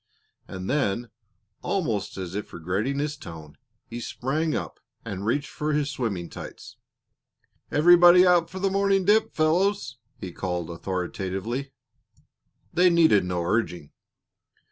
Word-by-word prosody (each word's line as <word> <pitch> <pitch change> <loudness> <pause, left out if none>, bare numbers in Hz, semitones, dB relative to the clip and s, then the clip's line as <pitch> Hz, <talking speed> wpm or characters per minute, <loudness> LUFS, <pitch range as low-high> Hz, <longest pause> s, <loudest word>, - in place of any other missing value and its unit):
And 95 -1 -7
then, 120 -4 -1 0.5
almost 130 - -2
as 90 -2 -5
if 105 +1 -5
regretting 95 - -2
his 150 +1 -2
tone, 80 - -11 0.3
he 120 - -7
sprang 150 +7 -2
up - - -5 0.3
and 100 -2 -5
reached 145 +5 -1
for 150 0 -2
his 145 0 0
swimming 105 -11 -3
tights. - - -10 1.0
"Everybody 175 +3 +7
out 175 -2 +4
for 185 - -8
the 190 0 0
morning 195 -1 +2
dip, 220 +2 +3
fellows," 175 - +1 0.2
he 90 - -7
called 90 -2 -4
authoritatively. 95 +8 -4 1.0
They 180 +1 +5
needed 160 - +4
no 90 -1 -2
urging. 90 -6 -1
130 Hz, 125 wpm, -25 LUFS, -, 1.0 s, Everybody